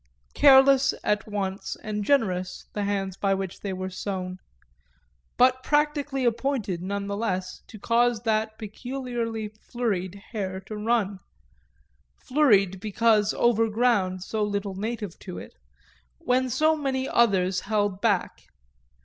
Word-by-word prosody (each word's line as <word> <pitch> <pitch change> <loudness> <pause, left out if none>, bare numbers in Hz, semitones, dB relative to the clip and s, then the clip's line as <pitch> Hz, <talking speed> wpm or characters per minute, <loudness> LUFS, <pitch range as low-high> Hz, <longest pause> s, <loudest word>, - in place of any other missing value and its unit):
Careless 275 -1 +6
at 210 0 0
once 200 -2 -3
and 210 -1 -3
generous 185 -8 0
the 205 -1 -2
hands 195 -2 -2
by 195 -1 +1
which 190 -1 -5
they 200 - -4
were 185 0 -4
sown, 185 -1 -4 1.0
but 255 +1 +4
practically 290 -2 0
appointed 230 -6 -1
none 200 +2 -3
the 200 0 -3
less 185 -4 -3
to 220 - -11
cause 235 +2 +2
that 220 -1 0
peculiarly 230 -1 -4
flurried 210 -4 -3 0.2
hare 190 -5 -3
to 215 +3 -8
run 210 -3 0 1.0
flurried 205 -10 +3
because 215 0 +2
over 225 -1 +3
ground 205 -5 +1
so 220 +2 -3
little 200 -1 -1
native 210 -1 -5
to 180 -3 -8
it - - -9 0.6
when 255 +1 +1
so 310 +6 +3
many 270 -3 -2
others 190 -5 +2
held 205 -2 -1
back. 205 -6 0
215 Hz, 130 wpm, -26 LUFS, 195-240 Hz, 1.0 s, Careless